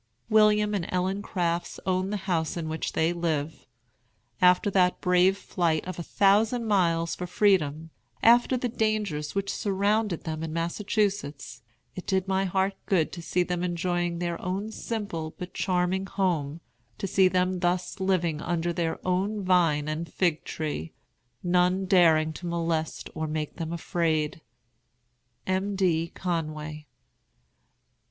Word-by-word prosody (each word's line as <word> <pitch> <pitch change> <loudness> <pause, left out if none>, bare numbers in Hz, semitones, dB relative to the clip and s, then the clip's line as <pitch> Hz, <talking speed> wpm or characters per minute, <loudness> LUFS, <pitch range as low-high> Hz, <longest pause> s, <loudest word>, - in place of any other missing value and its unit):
"William 210 -1 +4
and 190 -5 -1
Ellen 185 +2 -1
Crafts 175 -4 -2
own 185 0 0
the 210 - -1
house 165 -3 0
in 165 -2 -3
which 160 +1 -3
they 160 +2 +2
live. 160 -3 -2 0.7
After 180 +2 +5
that 180 -2 +3
brave 180 +2 +3
flight 170 -5 -1
of 185 0 -6
a - - -2
thousand 210 +7 +2
miles 170 -5 +2
for 180 - -5
freedom, 160 -6 +1 0.3
after 240 +2 +5
the 245 - -1
dangers 215 -10 -1
which 200 0 -1
surrounded 205 -1 0
them 155 -1 -4
in 160 -1 -4
Massachusetts, 165 - -2 0.3
it 185 - -8
did 190 -1 +1
my 190 0 +1
heart 190 +1 +1
good 175 -5 +2
to 175 - -7
see 180 +2 0
them 175 0 -2
enjoying 175 0 -1
their 170 -1 -3
own 195 +4 -3
simple 200 -9 -4
but 180 0 -7
charming 185 +1 0
home, 170 -6 -1 0.4
to - - -3
see 190 0 +4
them 185 0 +1
thus 175 +1 -1
living 175 -5 0
under 175 0 -1
their 165 -1 -1
own 195 +3 0
vine 165 -5 +3
and 155 +1 -4
fig 170 -4 0
tree, 150 - -4 0.5
none 180 +2 +2
daring 160 -4 +4
to 175 - -7
molest 165 -2 -2
or 155 0 -3
make 155 -1 -4
them 165 -1 -4
afraid. 165 -3 -1 1.0
"M. 190 +2 -1
D. 170 -4 +1
CONWAY." 155 -3 -4
180 Hz, 145 wpm, -27 LUFS, 165-195 Hz, 1.0 s, After